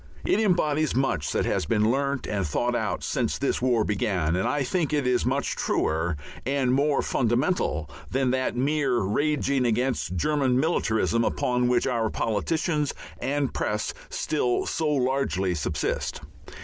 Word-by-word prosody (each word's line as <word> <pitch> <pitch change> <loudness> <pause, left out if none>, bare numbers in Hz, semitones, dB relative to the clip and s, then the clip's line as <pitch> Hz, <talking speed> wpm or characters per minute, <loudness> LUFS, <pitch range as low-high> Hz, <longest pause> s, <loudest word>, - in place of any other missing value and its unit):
It - - +2
embodies 155 - +2
much 130 - 0
that - - 0
has - - 0
been 110 +2 +2
learnt 140 +1 -1
and 100 -2 -1
thought 120 +10 0
out 105 -6 -1
since - - -1
this - - -1
war 120 -3 +2
began, 95 -6 0
and 95 - 0
I 145 -1 0
think 160 +3 -1
it 145 -3 +1
is 125 -1 +1
much 135 +2 0
truer 80 +1 0 0.3
and 135 -1 +1
more 140 +1 +2
fundamental 120 - 0 0.2
than 130 -1 +1
that 130 -1 0
mere 135 0 +1
raging 140 +5 +1
against 120 -5 0
German 130 - +1
"militarism," 115 -7 +1
upon 125 +1 +1
which 125 0 +2
our 115 -4 0
politicians 150 - -1 0.2
and 140 +1 -1
press 105 0 -1 0.2
still 125 -6 0
so 160 -2 -1
largely 130 -9 0
subsist. 75 -5 -2
125 Hz, 150 wpm, -26 LUFS, 110-140 Hz, 0.3 s, It